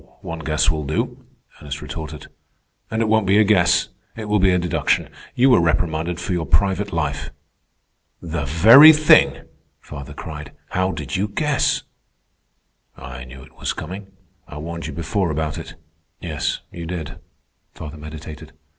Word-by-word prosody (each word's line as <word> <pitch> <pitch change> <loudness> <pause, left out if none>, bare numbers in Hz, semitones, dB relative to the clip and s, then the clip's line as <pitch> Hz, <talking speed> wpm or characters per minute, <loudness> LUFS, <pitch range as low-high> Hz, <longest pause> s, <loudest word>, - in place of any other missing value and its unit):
"One 80 0 -6
guess 80 0 +1
will 75 -1 -3
do," 75 +2 -3 0.3
Ernest 70 0 -6
retorted. 75 -2 -7 0.6
"And 110 0 0
it - - 0
won't 110 -2 +2
be 100 +2 +4
a 110 - +6
guess. 90 -5 +3 0.3
It 110 - -6
will 105 0 +2
be 95 0 +4
a 90 - +3
deduction. 90 -1 0 0.3
You 130 +2 +5
were 120 - +6
reprimanded 85 0 0
for 90 +1 -3
your 85 -3 -2
private 95 +5 +1
life." 75 -4 -2 0.9
"The 85 -3 -4
very 115 - +9
thing!" 155 0 +4 0.4
father 70 0 -9
cried. 75 -1 -8 0.2
"How 95 +1 0
did 75 +1 -5
you 100 +3 0
guess?" 150 +7 0 1.1
"I 65 0 -9
knew 65 +1 -12
it - - -19
was - - -2
coming. 95 +5 -7 0.4
I 75 - -9
warned 85 +1 -6
you 80 - -6
before 90 +4 -1
about 75 -1 -2
it." - - -9 0.4
"Yes, 75 -4 -3
you 85 -1 -7
did," 80 -5 -6 0.6
father 80 0 -8
meditated. 75 0 -10
85 Hz, 155 wpm, -21 LUFS, 75-95 Hz, 1.1 s, very